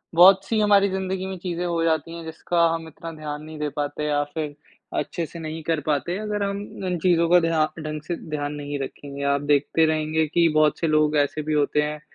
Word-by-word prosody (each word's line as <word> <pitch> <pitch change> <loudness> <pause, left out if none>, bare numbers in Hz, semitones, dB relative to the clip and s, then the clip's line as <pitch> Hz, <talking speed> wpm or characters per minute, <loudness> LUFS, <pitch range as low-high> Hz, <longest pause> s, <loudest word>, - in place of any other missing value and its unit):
बहुत-सी 195 +5 +6
हमारी 200 -1 +5
ज़िंदगी 190 0 -2
में 190 -1 -5
चीज़ें 175 -1 -2
हो 170 -1 0
जाती 165 0 0
हैं, 170 - -7
जिसका 170 +1 +1
हम 165 -1 -4
इतना 165 +1 -8
ध्यान 150 -1 -6
नहीं 155 0 -9
दे 150 0 -1
पाते 145 +1 -2
या 145 -1 +1
फ़िर 150 -2 -3 0.4
अच्छे-से 170 0 -4
नहीं 160 0 -5
कर 165 -2 +1
पाते। 155 +5 0
अगर 210 -1 -2
हम 200 0 -2 0.3
इन 180 - 0
चीज़ों 170 -2 +3
का 180 +1 +7
ध्या 165 -2 +2 0.2
ढंग 155 -1 -5
से 175 - -1
ध्यान 145 -1 -2
नहीं 145 -1 -4
रखेंगे 140 +1 -6
आप 140 - 0
देखते 145 +2 +2
रहेंगे 155 0 +1
कि 170 +3 +3
बहुत 155 -1 +4
से 165 - 0
लोग 155 0 +3
ऐसे 145 +1 +1
भी 155 - -2
होते 150 0 +2
हैं 150 0 -3
160 Hz, 215 wpm, -24 LUFS, 150-175 Hz, 0.4 s, का